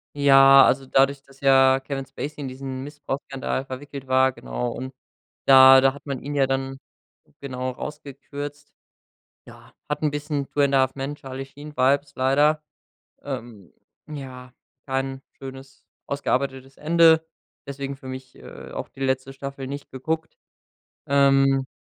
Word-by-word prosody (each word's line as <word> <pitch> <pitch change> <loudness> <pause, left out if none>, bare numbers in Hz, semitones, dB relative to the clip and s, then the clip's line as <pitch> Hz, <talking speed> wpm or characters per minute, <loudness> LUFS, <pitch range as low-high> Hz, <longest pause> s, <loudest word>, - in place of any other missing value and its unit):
Ja, 135 -1 +7
also 135 - +1
dadurch, 135 +1 +2
dass 135 0 -22
ja 135 -1 +5
Kevin 135 0 -5
Spacey 140 +3 -7
in 140 - -4
diesen 130 0 -6
Missbrauchsskandal 140 -2 -4
verwickelt 135 +1 -8
war 130 0 +4
genau, - - -4
und 130 +2 -6 0.5
da 130 0 +9
da 135 0 +3
hat 140 - -14
man 140 -3 -4
ihn 145 - -5
ja 135 -1 +3
dann 135 0 -2 0.6
genau 130 -2 -4
rausgekürzt. 145 +1 -8 0.7
Ja, - - -16
hat 150 0 -3
'n 150 - +2
bisschen 145 -1 -3
„Two 145 - -2
and 140 -1 +3
a 135 - +5
Half 130 0 +1
Men“-Charly-Sheen-Vibes 140 0 -2
leider 145 +4 +3 0.6
ähm, 110 -6 -7 0.4
ja, 130 -4 -9 0.3
kein 135 0 -3 0.2
schönes, 135 0 -11 0.2
ausgearbeitetes 135 -1 -2
Ende 160 0 +4 0.4
deswegen 140 0 -5
für 135 - -12
mich, 130 0 -8
äh, - - -12
auch - - -5
die 135 - -14
letzte 130 0 -1
Staffel 135 0 -7
nicht 140 +1 -7
geguckt, 160 +5 -4 0.7
ähm. 135 -1 +3
135 Hz, 140 wpm, -24 LUFS, 130-140 Hz, 0.7 s, da